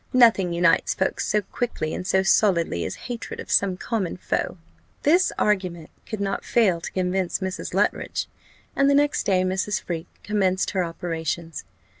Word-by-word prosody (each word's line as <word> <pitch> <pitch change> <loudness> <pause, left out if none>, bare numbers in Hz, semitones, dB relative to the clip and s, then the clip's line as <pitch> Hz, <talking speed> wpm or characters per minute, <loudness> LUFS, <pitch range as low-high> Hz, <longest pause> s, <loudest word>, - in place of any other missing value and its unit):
Nothing 230 -8 +5
unites 170 0 +3
folk 190 - -1
so 210 0 +1
quickly 195 -6 -3
and 180 - -4
so 190 0 +3
solidly, 170 - +2
as 95 - -4
hatred 240 -2 -6
of - - -7
some 190 -2 +3
common 200 -5 -2
foe." 180 - -2 0.5
This 350 +6 +4
argument 185 -6 0 0.2
could 215 - -4
not 195 -1 -2
fail 195 -8 +2
to - - -6
convince 185 0 0
Mrs. 190 -1 -4
Luttridge, - - 0 0.5
and 275 0 +4
the 280 - +4
next 290 0 +2
day 185 -2 +3
Mrs. 190 +3 0
Freke 170 -1 -5 0.2
commenced 190 -3 +1
her 190 -2 +1
operations. 165 -1 -4
190 Hz, 160 wpm, -24 LUFS, 175-210 Hz, 0.5 s, Nothing